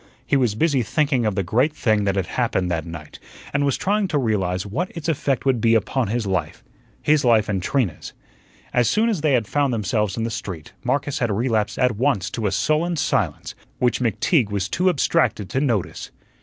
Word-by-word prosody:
He - - +1
was 125 -6 +2
busy 145 0 +2
thinking 130 0 +1
of 105 - -1
the 100 - 0
great 120 - +1
thing 110 -7 +1
that 100 -1 +1
had 95 -3 0
happened 90 -1 -1
that 80 -1 -2
night, 80 -2 -9 0.3
and 140 0 +1
was 140 -2 +1
trying 205 +1 +1
to 155 - 0
realize 95 -7 0
what 145 - -2
its 165 - -5
effect 140 -5 0
would 130 -4 +2
be 115 0 +4
upon 120 +3 0
his 115 +2 -1
life 95 -1 -2 0.4
his 150 -1 +3
life 115 -4 +4
and 95 -3 -1
Trina's. 100 - -1 0.6
As 120 -2 +3
soon 225 +2 +2
as 200 -9 -1
they 150 -2 +2
had 120 -4 +2
found 140 +4 0
themselves 105 -2 -1
in 115 - -1
the 115 - -2
street, 95 -8 -6
Marcus 145 0 -1
had 120 - 0
relapsed 110 0 0
at 125 -4 +1
once 115 -7 0
to 110 -3 -2
a - - -1
sullen 155 - +1
silence, 105 - -1 0.2
which 125 -1 +1
McTeague 115 - +1
was 100 -2 -1
too 185 - +1
abstracted 155 - +1
to 130 - 0
notice. 115 -10 -1
115 Hz, 205 wpm, -22 LUFS, 100-145 Hz, 0.6 s, be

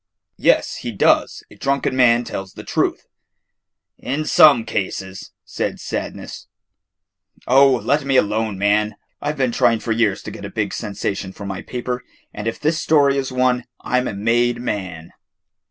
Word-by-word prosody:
"Yes, - - +2
he 120 - -5
does, 100 - +2
a - - -13
drunken 135 -1 0
man 120 -2 +4
tells 95 -4 -6
the - - -10
truth." - - -1 0.9
"In 140 +5 -3
some 140 -7 +6
cases," 95 -1 -4
said - - -3
Sadness. - - -6 1.0
"Oh, 135 +2 +6
let 145 +4 +1
me 135 -1 0
alone, 110 -3 +1
man. 105 +1 +1 0.3
I 145 - -1
've 150 - -9
been 130 -3 +1
trying 115 -1 +2
for 115 - -4
years 110 -3 +1
to - - -7
get - - -10
a - - -5
big - - -2
sensation 100 -1 -4
for 100 - -9
my 95 -1 -5
paper, 125 0 -4 0.3
and 105 +1 -5
if 115 - -3
this 155 +1 0
story 140 -3 +3
is 135 -1 -2
one, 125 -1 +1 0.2
I 125 - +1
'm 125 - -2
a - - -4
made 120 +3 +1
man." 95 -9 -5
120 Hz, 170 wpm, -20 LUFS, 105-130 Hz, 1.0 s, some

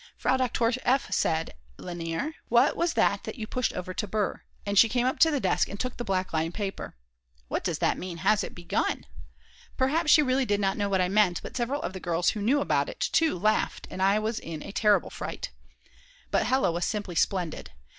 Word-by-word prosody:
Frau - - +2
Doktor 245 -2 +1
F. 265 +2 +1
said: 160 0 0 0.2
Lainer, 175 - -4 0.2
what - - +4
was 340 0 0
that - - +1
you 220 -5 -5
pushed 250 +2 -1
over 185 0 -5
to 210 - -3
Br.? 210 -1 0 0.3
and 200 0 -2
she 225 +3 +7
came 245 0 +1
up 260 - 0
to 325 - +7
the 295 -3 0
desk - - +1
and 200 - -7
took 255 0 -3
the 240 - -3
black 190 -4 -1
line 160 +1 0
paper. 195 - -5 0.5
"What - - -2
does - - -1
that - - +1
mean: 180 -2 -6
Has 215 - +4
it - - -7
begun???" 175 -1 -2 0.7
Perhaps 300 +5 +1
she 305 0 +7
really 260 0 +1
did 205 -3 +1
not 195 -1 +1
know 205 -1 -1
what 190 -2 +2
I 180 - +2
meant, 190 -2 +2
but - - -8
several 260 +4 -1
of - - -3
the 190 - -6
girls 175 -1 +1
who 210 - -5
knew 265 +8 +2
about - - +1
it - - -9
too 325 - +2
laughed, 215 +4 0
and 185 - -5
I 195 +2 +4
was 215 +1 -1
in 160 -2 -7
a - - -7
terrible 210 0 +2
fright. - - -6 0.8
But - - +2
Hella 260 -7 +2
was 170 +1 -2
simply 205 -4 -3
splendid. 175 -1 -1
210 Hz, 215 wpm, -27 LUFS, 185-255 Hz, 0.8 s, she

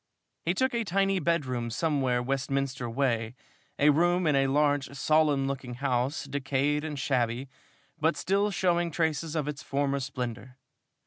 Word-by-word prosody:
He 175 +2 0
took 260 +5 +1
a 235 -1 0
tiny 195 0 +1
bedroom 135 -8 -1
somewhere 130 -2 0
Westminster 135 -1 -2
way 115 -2 0 0.4
a 150 +1 +5
room 175 +4 +2
in 150 -2 +3
a 135 0 +3
large, 145 0 +1
solemn 150 -1 +2
looking 135 -2 -4
house, 130 +1 -1
decayed 145 +1 0
and 155 -2 -4
shabby, 125 -2 0 0.5
but 160 +2 +2
still 200 +3 +1
showing 175 -3 +1
traces 160 -1 -1
of 150 -2 -1
its 150 -1 -4
former 140 0 -1
splendor. 125 -1 -5
140 Hz, 145 wpm, -28 LUFS, 130-160 Hz, 0.5 s, a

